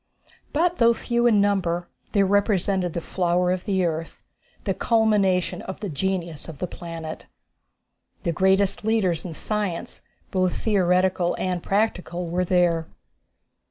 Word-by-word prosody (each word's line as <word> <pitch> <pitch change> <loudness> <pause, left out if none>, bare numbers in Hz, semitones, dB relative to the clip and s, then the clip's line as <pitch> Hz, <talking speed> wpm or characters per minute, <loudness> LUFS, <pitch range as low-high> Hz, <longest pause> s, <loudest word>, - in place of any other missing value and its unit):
But 350 +3 +1
though 235 0 +5
few 235 +1 +1
in 215 -3 +4
numbers, 180 -4 +1 0.3
they 200 - +4
represented 195 -3 +1
the 170 - -2
flower 180 +1 +1
of 185 -1 -2
the 190 -4 +1
earth, 165 0 -4 0.4
the - - 0
culmination 210 -6 +2
of 190 - -7
the 205 -2 -4
genius 170 0 -3
of 155 - -9
the 180 - -2
planet. 165 -2 -7 1.0
The 170 - +1
greatest 190 +4 +2
leaders 205 -7 +1
in 165 -3 -6
science, 205 -4 -3 0.3
both 185 -2 +1
theoretical 185 -3 +2
and 180 -2 -1
practical, 180 -4 -1
were 175 +2 0
there. 170 -2 +2
185 Hz, 135 wpm, -24 LUFS, 175-205 Hz, 1.0 s, though